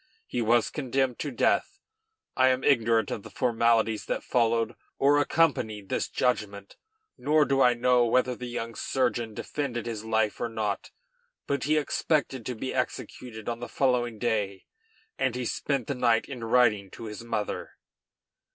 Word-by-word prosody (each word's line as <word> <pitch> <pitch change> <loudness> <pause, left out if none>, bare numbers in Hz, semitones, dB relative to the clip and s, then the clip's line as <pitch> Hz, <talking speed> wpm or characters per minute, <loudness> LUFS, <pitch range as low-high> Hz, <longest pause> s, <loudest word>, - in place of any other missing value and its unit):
He 120 - -2
was 115 +1 +3
condemned 130 -3 -1
to 150 - -2
death. 125 - +1 0.6
I 130 0 +5
am 130 0 +2
ignorant 115 -5 +3
of - - -3
the - - -11
formalities 115 -2 +1
that - - -2
followed 115 -1 +1 0.2
or 145 +2 +4
accompanied 120 -10 +1
this - - -1
judgment, 100 -5 -1 0.4
nor 150 0 +3
do 135 -1 +2
I 125 -2 +5
know 120 0 +3
whether 125 +1 +2
the 125 +1 -7
young 115 -1 -4
surgeon 120 -3 -1
defended 125 -4 -3
his 110 -2 -4
life 110 -1 0
or 120 - -1
not; 105 -3 -3 0.6
but 140 -2 -1
he 155 +2 +3
expected 145 -4 0
to 125 - -3
be 130 +4 -4
executed 110 -4 -4
on 115 -1 -2
the 120 - -6
following 120 -4 +1
day, 105 -4 -1 0.5
and 130 -2 +1
he 125 -1 -3
spent 135 +1 -1
the 140 - -2
night 120 -3 +2
in 130 -4 -7
writing 110 -4 +3
to 115 - -10
his 110 +1 -7
mother. 110 -3 -4
120 Hz, 160 wpm, -27 LUFS, 110-130 Hz, 0.6 s, I